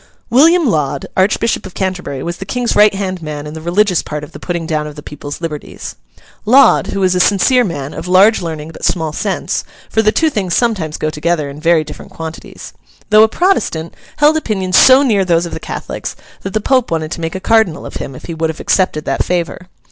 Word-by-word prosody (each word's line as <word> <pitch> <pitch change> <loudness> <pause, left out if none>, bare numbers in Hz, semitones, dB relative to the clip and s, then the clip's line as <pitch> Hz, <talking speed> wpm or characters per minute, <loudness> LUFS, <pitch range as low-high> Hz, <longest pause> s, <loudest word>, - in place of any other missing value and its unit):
William 325 +7 +5
Laud, 145 - 0
Archbishop 205 +2 +1
of 185 - -14
Canterbury, 180 -8 -3
was 170 0 -4
the - - -6
King's 245 +3 -1
right 210 -1 +5
hand 185 -2 -3
man 150 -2 -6
in 150 - -7
the 160 - -7
religious 180 +2 +2
part 150 0 -6
of 150 - -10
the - - -10
putting 170 -2 -3
down 155 -1 -2
of 150 - -9
the 150 - -10
people's 145 +1 -8
liberties. 150 -3 -6 0.5
Laud, 255 +4 +5
who 195 - -3
was 185 -1 +3
a 180 - +1
sincere 205 +7 +4
man, 145 - -4
of - - -6
large 195 +5 +5
learning 160 -2 -5
but - - -13
small 160 -3 0
sense—for 220 - -2
the 215 -1 +3
two 315 +6 +1
things 190 -8 -1
sometimes 190 -11 0
go 155 - -2
together 155 -2 -1
in 140 - -10
very 165 0 +3
different - - -10
quantities—though 165 +6 -2
a - - +6
Protestant, 220 - 0 0.2
held 300 +1 +4
opinions 190 -10 -1
so 260 +6 +7
near 215 -7 +2
those 170 -2 +1
of 170 - -7
the - - -4
Catholics, - - -6 0.3
that 195 - -6
the - - +3
Pope 255 +1 +1
wanted 160 -1 -2
to 170 - -5
make 165 +2 -3
a - - -3
Cardinal 220 -5 +1
of - - -7
him, 135 - -6
if - - -11
he 170 - -5
would 160 0 -1
have 160 - -6
accepted 185 -5 0
that 135 - 0
favour. 180 0 -3
180 Hz, 215 wpm, -15 LUFS, 155-215 Hz, 0.5 s, so